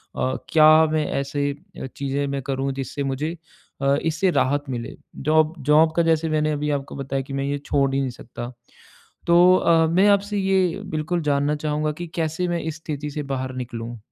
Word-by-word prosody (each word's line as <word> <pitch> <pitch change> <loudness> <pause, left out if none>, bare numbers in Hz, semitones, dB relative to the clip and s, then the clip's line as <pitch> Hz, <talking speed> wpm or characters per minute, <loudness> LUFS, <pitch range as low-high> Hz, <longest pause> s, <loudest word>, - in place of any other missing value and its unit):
अ, 130 0 -1
क्या 155 0 +7
मैं 155 -1 +1
ऐसे 140 +1 -1 0.3
अ, - - -4
चीज़ें 140 +1 -1
मैं 140 0 -3
करूँ 135 0 -2
जिससे 135 +1 -4
मुझे 150 +5 -3 0.4
अ, 140 0 +3
इससे 165 +3 +1
राहत 145 -1 +1
मिले? 120 -2 -5 0.2
जॉब 155 +2 +2 0.2
जॉब 160 +1 +5
का 170 - +4
जैसे 160 0 +1
मैंने 155 0 +1
अभी 150 0 -2
आपको 135 - -10
बताया 135 0 -3
कि 135 +1 -9
मैं 135 0 -1
ये 145 0 -1
छोड़ 135 -1 +1
ही - - +2
नहीं 130 - -1
सकता। 120 0 -8 0.8
तो 175 +2 +6
अ, 165 -1 +3
मैं 185 +5 +3
आपसे 205 +1 +2
ये 190 -1 +1 0.2
बिल्कुल 165 +3 -1
जानना 145 0 +1
चाहूँगा 150 0 -1
कि 175 - -4
कैसे 165 +2 -1
मैं 170 -1 -1
इस 160 -1 -4
स्थिति 150 -2 -5
से 150 0 -4
बाहर 130 0 -3
निकलूँ? 120 -1 -6
150 Hz, 190 wpm, -23 LUFS, 135-160 Hz, 0.8 s, क्या